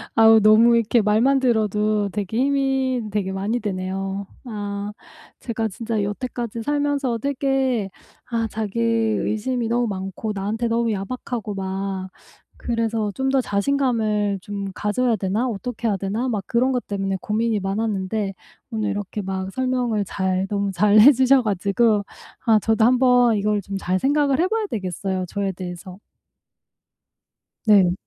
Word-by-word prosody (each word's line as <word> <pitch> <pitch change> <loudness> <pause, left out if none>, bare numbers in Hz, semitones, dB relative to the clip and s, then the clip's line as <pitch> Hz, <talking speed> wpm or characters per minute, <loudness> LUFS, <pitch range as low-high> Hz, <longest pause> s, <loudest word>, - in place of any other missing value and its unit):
아우 225 0 +7
너무 220 +3 +6
이렇게 230 +1 +2
말만 225 +7 +3
들어도 215 -4 +1
되게 205 +2 -3
힘이 270 -1 +1
되게 200 -2 -1
많이 205 +5 -1
되네요. 195 0 -3 0.2
아. 205 -2 -4 0.5
제가 225 -2 -2
진짜 220 +2 -3
여태까지 230 +2 -4
살면서 285 -3 0
되게 265 -4 0 0.4
아 230 -1 0
자기 215 0 -4
의심이 230 +1 0
너무 240 0 +1
많고 195 +2 -4
나한테 215 +4 -2
너무 230 0 +1
야박하고 215 +1 -4
막 190 0 -4 0.5
그래서 230 -3 -1
'좀 265 +3 -1
더 270 0 +3
자신감을 215 -3 0
좀 200 0 -5
가져야 225 +4 0
되나? 205 +6 -1
어떻게 235 +1 -4
해야 200 -3 +1
되나?' 210 +7 -2
막 210 -5 -2
그런 250 +3 +2
것 250 -1 -2
때문에 195 -1 -2
고민이 220 +1 0
많았는데, 195 0 -2 0.4
오늘 215 -2 -1
이렇게 205 0 -4
막 190 0 -4
설명을 250 -4 0
잘 190 0 -1
너무 200 -1 -1
잘 205 +4 +3
해 275 +7 +10
주셔 260 +1 +4
가지고 205 +1 +1 0.4
아 220 -2 +5
저도 220 +1 +2
한번 245 -2 +4
이걸 210 0 0
좀 195 +1 -5
잘 185 -1 -1
생각을 285 0 +2
해 360 - +3
봐야 445 +1 -1
되겠어요, 190 - -3
저에 200 +2 -2
대해서. 180 0 -8 1.7
네. 195 -5 +5
215 Hz, 295 characters per minute, -22 LUFS, 200-240 Hz, 1.7 s, 해